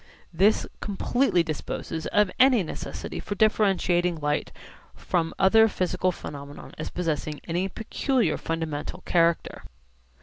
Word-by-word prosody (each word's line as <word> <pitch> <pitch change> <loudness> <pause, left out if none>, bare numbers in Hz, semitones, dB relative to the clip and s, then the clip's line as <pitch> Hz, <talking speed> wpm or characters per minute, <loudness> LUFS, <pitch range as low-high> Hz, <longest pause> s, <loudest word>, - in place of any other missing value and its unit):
This 195 +6 +3
completely 205 -1 +1
disposes 160 0 -4
of 205 -2 +2
any 255 -5 +6
necessity 160 - -6
for 205 - -5
differentiating 185 -5 +2
light 150 0 -1 0.4
from 165 -2 -1
other 220 +4 +6
physical 185 -2 0
phenomena 145 -4 -9
as 155 - -4
possessing 155 -3 -3
any 180 +3 -1
peculiar 240 +4 0
fundamental 160 -3 -4
character. 170 -1 +1
180 Hz, 110 wpm, -26 LUFS, 160-205 Hz, 0.4 s, any